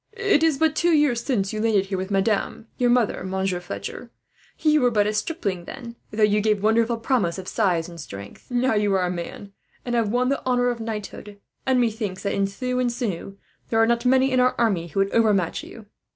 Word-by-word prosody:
"It 400 -7 +2
is 320 -3 +3
but 320 0 +2
two 345 +1 +2
years 255 -6 +2
since 205 -8 -1
you 215 - -2
landed 215 -4 +2
here 195 0 -3
with 190 +1 -4
madame, 200 +2 0
your 245 -1 +3
mother, 240 -6 +2
Monsieur 190 -1 -1
Fletcher. 175 - -7 0.5
You 305 -1 +3
were 250 - +4
but 210 -3 +2
a 210 - 0
stripling 210 - -2
then, 235 +4 -8
though 215 0 0
you 210 0 +4
gave 210 -1 +1
wonderful 230 +2 +2
promise 225 -7 0
of 190 -1 -7
size 175 -5 0
and 170 -2 -9
strength. 100 -6 -10
Now 245 0 +1
you 210 -2 +2
are 185 -1 +2
a 180 - -1
man, 180 +3 -7 0.3
and 240 - -3
have 230 -3 +1
won 250 +3 +1
the 275 - -1
honour 245 -1 +2
of 240 -1 -3
knighthood; 210 -2 -6 0.3
and 260 -1 +3
methinks 215 -5 -1
that, 200 - -1
in 195 0 +1
thew 250 +5 -3
and 245 -1 +1
sinew, 200 -5 -4 0.3
there 225 - 0
are 225 - +6
not 235 0 +1
many 260 +1 +3
in 255 - +2
our 250 0 +3
army 195 -8 +1
who 195 +4 -1
would 195 - 0
overmatch 210 -6 +2
you." 225 -2 -12
220 Hz, 225 wpm, -23 LUFS, 195-245 Hz, 0.5 s, are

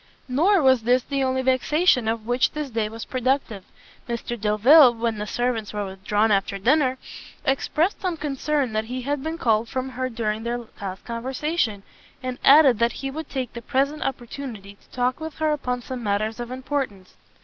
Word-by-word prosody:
Nor 330 +8 +3
was 260 -2 +5
this 245 +2 +2
the 275 -1 -1
only 260 0 0
vexation 260 0 +2
of 225 -1 -1
which 245 +2 +1
this 300 -3 -4
day 220 -2 -1
was 225 +1 -7
productive; 255 -5 -1 0.5
Mr 235 0 -3
Delvile, 240 +5 +6
when 230 -2 -2
the 210 - -4
servants 240 -3 -2
were 205 -1 -2
withdrawn 200 +3 0
after 195 0 +1
dinner, 260 +5 +2 0.5
expressed 305 +7 0
some 360 -3 -2
concern 285 -3 -1
that 215 0 -1
he 250 +2 -5
had 285 +1 -2
been 320 +3 -4
called 225 -5 +1
from 260 -1 -3
her 255 0 -3
during 220 -2 -2
their 235 +1 -3 0.2
last 190 -1 -6
conversation, 245 -2 -2 0.4
and 255 0 -4
added 275 -5 +7
that 235 0 +2
he 270 0 -5
would 315 +3 -6
take 255 -4 -4
the 235 - -7
present 280 +5 0
opportunity 240 -5 -5
to 200 - -28
talk 250 +1 -1
with 315 -1 -6
her 310 -1 0
upon 250 -4 -2
some 255 0 -6
matters 215 +1 -1
of 240 0 -5
importance. 255 -7 -4
250 Hz, 180 wpm, -24 LUFS, 225-275 Hz, 0.5 s, added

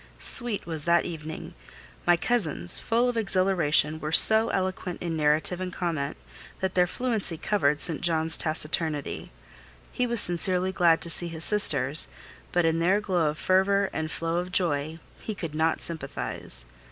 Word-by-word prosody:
Sweet 240 -4 +1
was 160 -3 -5
that 170 0 +2
evening. 160 -2 -8 0.5
My 175 -1 +5
cousins, 165 - -1
full 235 +2 0
of 245 -1 -2
exhilaration, 185 -7 +2
were 155 0 -5
so 220 +6 +7
eloquent 185 -1 -3
in 170 -2 -4
narrative 155 +4 +2
and 185 -1 -4
comment, 165 -6 -3 0.4
that 190 -1 -2
their 180 -1 +2
fluency 220 -6 -1
covered 150 -6 0
St. 165 -1 +3
John's 165 -1 +1
taciturnity: 155 -1 -2 0.6
he 250 - -1
was 235 -1 +2
sincerely 180 +1 +1
glad 170 -3 +2
to 170 - -1
see 175 - +2
his 165 -1 -6
sisters; 165 -8 +3 0.4
but 175 -1 +1
in 165 0 +1
their 185 +5 +2
glow 180 -7 0
of 150 - -6
fervour 195 +2 +1
and 155 0 -3
flow 165 +1 -3
of 180 +1 -4
joy 160 -3 -1 0.2
he 215 - -6
could 165 -5 -6
not 160 +1 0
sympathise. 105 - -6
170 Hz, 160 wpm, -26 LUFS, 160-190 Hz, 0.6 s, so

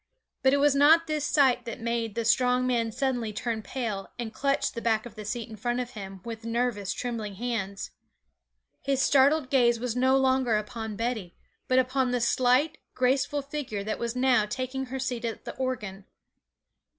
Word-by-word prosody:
But 265 - +4
it 280 - +3
was 290 0 +4
not 310 +4 +6
this 305 -2 -1
sight 270 -4 +3
that 235 - -6
made 230 -2 -2
the 230 - -1
strong 250 +2 +3
man 235 -3 +1
suddenly 245 -3 -1
turn 220 +1 -3
pale 215 -3 -4
and 235 -2 -5
clutch 275 +4 0
the 230 - -6
back 220 -1 +1
of 240 - -9
the 215 -1 -8
seat 225 +2 -4
in 225 - -9
front 240 +3 -1
of 250 -1 -4
him 195 -4 -8
with 225 -1 -6
nervous, 230 -4 -1
trembling 225 -5 -4
hands; 200 -3 -3 0.9
his 275 -1 0
startled 275 +2 +4
gaze 240 -4 +4
was 245 -1 -2
no 260 +1 +4
longer 260 -4 +2
upon 215 0 -5
Betty, 225 -5 -3 0.3
but 255 - +2
upon 260 0 +2
the 245 0 0
slight, 255 +6 +2 0.2
graceful 265 +3 +1
figure 275 -8 -4
that 215 +1 -3
was 235 0 -3
now 250 -4 +3
taking 260 +4 -3
her 265 +2 -4
seat 255 -2 -3
at 230 -1 -4
the - - -6
organ. 210 -7 -4
245 Hz, 185 wpm, -27 LUFS, 225-265 Hz, 0.9 s, not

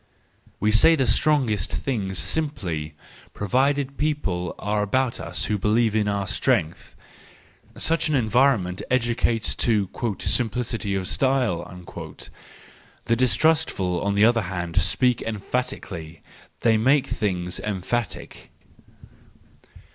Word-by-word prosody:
—We 105 - +2
say 140 +9 +6
the 135 -4 +1
strongest 115 - +2
things 100 -8 -2
simply, 85 - -2 0.4
provided 135 +6 0
people 100 - -1
are 105 0 -1
about 125 +4 0
us - - -2
who 105 -1 -1
believe 110 +2 +2
in 105 -1 +1
our 100 -1 -1
strength:—such 155 - -3
an 150 - +1
environ¬ 125 +1 +3
ment 90 +1 -5
educates 120 -2 +1
to 105 -4 +2 0.3
"simplicity 115 -3 -1
of 95 -1 -2
style." 90 -10 -1 1.2
The 115 - +2
distrustful, 120 - +2
on 100 0 0
the 105 +1 +5
other 115 0 +3
hand, 90 -2 -2
speak 125 +6 +1
emphatically; 95 -7 -4 0.4
they 115 -2 +4
make 130 +5 +3
things 90 -3 -2
emphatic. 105 +2 -4
110 Hz, 110 wpm, -24 LUFS, 95-130 Hz, 1.2 s, say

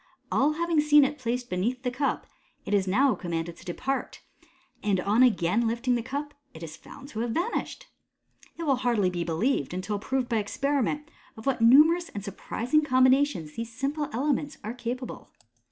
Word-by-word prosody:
All 295 +3 +3
having 335 -1 +1
seen 295 -1 +6
it 295 +2 -3
placed 245 0 -2
beneath 240 +7 -2
the 250 - -1
cup, 275 +3 -1 0.4
it 205 - -3
is 195 -2 +2
now 260 +8 +3
commanded 170 -2 -4
to - - -14
depart, 270 +10 -4 0.6
and 200 -3 +1
on 205 +6 +2
again 225 -2 +3
lifting 235 +2 0
the 240 - +1
cup, 285 +4 -5 0.2
it 160 - -9
is 155 -1 -7
found 275 0 -13
to 220 - -6
have 235 +1 -1
vanished. 385 - -2 0.7
It 335 - -5
will 275 -5 +2
hardly 235 -7 +1
be 175 -1 -2
b. 170 - -4
lieved, 180 - 0
until 200 +3 -3
proved 260 +4 -1
by 235 -3 0
experiment, 280 +7 -1 0.3
of 220 - -10
what 270 -4 0
numerous 310 +9 +6
and 205 - -7
surpris 220 +5 -6
ing 305 - +7
combinations 260 - +3
these 230 0 -5
simple 280 +5 -2
elements 285 +3 -1
are 215 +3 -4
capable. 245 +1 -6
250 Hz, 185 wpm, -27 LUFS, 210-280 Hz, 0.7 s, ing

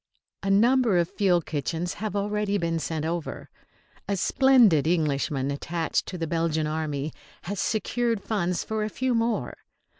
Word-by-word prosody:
A 195 - -2
number 230 +1 +4
of 170 0 +1
field 180 -5 +2
kitchens 160 +4 -2
have 215 -2 -3
already 205 0 0
been 165 -2 -1
sent 160 -1 -3
over. 165 0 -4 0.6
A 200 - 0
splendid 230 - +4
Englishman 145 -4 0
attached 160 +3 -2
to 185 - -5
the 165 - -2
Belgian 165 -1 0
Army 155 -1 -3 0.3
has 200 +1 -4
secured 230 -1 0
funds 180 -5 -1
for 220 -1 -2
a 215 - -2
few 255 +3 -1
more. 230 -1 0
175 Hz, 150 wpm, -26 LUFS, 160-215 Hz, 0.6 s, number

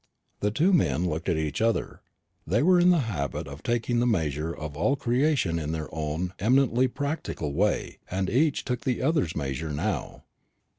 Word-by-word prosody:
The 105 - +1
two 165 - +2
men 90 - +2
looked 80 +2 -2
at 85 - +1
each 75 +3 -2
other. 115 0 0 0.5
They 105 - +2
were 180 +1 +5
in 175 +1 +5
the 175 -4 +4
habit 70 -13 -3
of 70 +1 -9
taking 120 0 0
the 120 - +2
measure 80 - 0
of 75 -3 -6
all 110 - +2
creation 125 - +1
in 80 0 -3
their 80 -1 -5
own 80 +3 -3
eminently 125 +3 +3
practical 140 - -3
way, 105 +7 0
and 95 +1 -1
each 145 +7 +1
took 125 -2 -2
the 125 +1 -1
other's 135 - +1
measure 70 +1 -3
now. 75 0 -3
100 Hz, 180 wpm, -27 LUFS, 80-130 Hz, 0.5 s, were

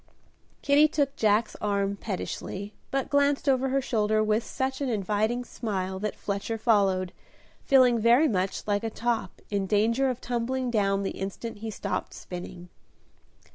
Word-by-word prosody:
Kitty 290 +2 +5
took 285 -2 0
Jack's 215 +1 +2
arm 200 -1 0
pettishly, 200 0 -5 0.2
but 270 -1 -1
glanced 285 0 +2
over 265 -1 +3
her 270 +1 +1
shoulder 215 -3 +1
with 215 +1 +1
such 265 +1 -3
an 275 - 0
inviting 215 +3 0
smile 190 -6 -3
that 210 +1 -3
Fletcher 200 +3 -3
followed, 195 -5 +2 0.5
feeling 255 -4 +5
very 240 +8 +5
much 190 -5 -1
like 205 0 0
a 225 - -1
top, 235 +1 -2
in 200 -2 0
danger 230 +6 +2
of 250 -1 -3
tumbling 250 +1 -2
down 200 -3 +1
the 195 - -2
instant 200 +3 -6
he 220 +1 -5
stopped 215 - -4
spinning. 180 0 -8
220 Hz, 150 wpm, -27 LUFS, 200-255 Hz, 0.5 s, Kitty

